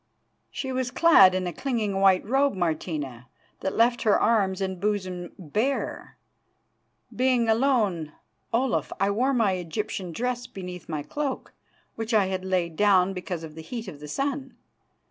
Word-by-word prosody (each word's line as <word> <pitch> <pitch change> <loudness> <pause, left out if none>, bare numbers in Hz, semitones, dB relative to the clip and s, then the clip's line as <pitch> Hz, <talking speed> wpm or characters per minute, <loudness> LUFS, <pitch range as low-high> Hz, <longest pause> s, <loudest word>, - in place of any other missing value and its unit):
"'She 265 - -4
was 255 -1 -1
clad 245 - +6
in 185 0 -1
a 175 - -3
clinging 215 - -1
white 195 -1 +4
robe, 270 +2 +2
Martina, 155 -8 -3 0.3
that 190 - -3
left 240 +1 +3
her 215 - +3
arms 200 -4 +2
and 190 -2 -3
bosom 185 -4 -2
bare' 215 - -2 1.0
being 250 -2 +2
alone, 220 - +2 0.4
Olaf, 250 +2 0
I 195 +1 +2
wore 250 +7 +1
my 230 -7 +2
Egyptian 185 +2 -4
dress 245 +5 -2
beneath 180 -3 -8
my 155 -2 -3
cloak, 290 - -4 0.4
which 225 0 -2
I 205 -3 +5
had 185 -1 -3
laid 180 -3 -1
down 195 -1 +4
because 180 -2 -5
of 155 -1 -8
the 160 - -9
heat 230 +5 -6
of 150 -6 -8
the 150 - -9
sun. 275 - -3
200 Hz, 155 wpm, -26 LUFS, 180-245 Hz, 1.0 s, clad